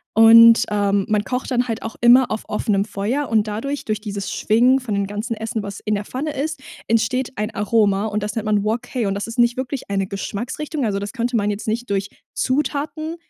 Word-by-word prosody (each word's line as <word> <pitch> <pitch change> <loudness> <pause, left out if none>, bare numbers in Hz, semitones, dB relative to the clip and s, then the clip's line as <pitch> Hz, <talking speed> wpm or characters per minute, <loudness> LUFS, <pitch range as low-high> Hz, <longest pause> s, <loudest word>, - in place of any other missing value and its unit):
Und, 230 +1 +8
ähm, 200 -1 +1
man 210 -1 +1
kocht 250 +3 -3
dann 250 0 +1
halt 225 -1 -3
auch 225 - -6
immer 245 +2 +6
auf 215 - -3
offenem 205 -1 0
Feuer 220 +8 -2
und 220 -2 +2
dadurch 275 +7 -4
durch 215 -1 -2
dieses 200 -2 -5
Schwingen 245 +5 +3
von 245 -5 -5
dem 200 0 -1
ganzen 210 +4 -4
Essen, 220 0 -4
was 200 0 -7
in 210 0 -1
der 205 0 -4
Pfanne 290 +7 -4
ist, 295 0 -3 0.3
entsteht 230 +3 0
ein 210 +1 -1
Aroma 205 -1 +2
und 210 0 -2
das 210 0 -4
nennt 225 -1 -3
man 210 -1 +1
Wok 220 +3 0
hei 240 -5 0
und 195 - -1
das 200 - -3
ist 230 +2 -6
nicht 240 0 +3
wirklich 260 -1 -4
eine 195 -1 0
Geschmacksrichtung. 245 - -4
Also, 200 -2 -1
das 200 0 -6
könnte 240 -1 -1
man 205 -1 0
jetzt 205 +2 -4
nicht 235 +3 -2
durch 195 0 -1 0.3
Zutaten 300 +4 -2
220 Hz, 220 wpm, -21 LUFS, 205-250 Hz, 0.3 s, Und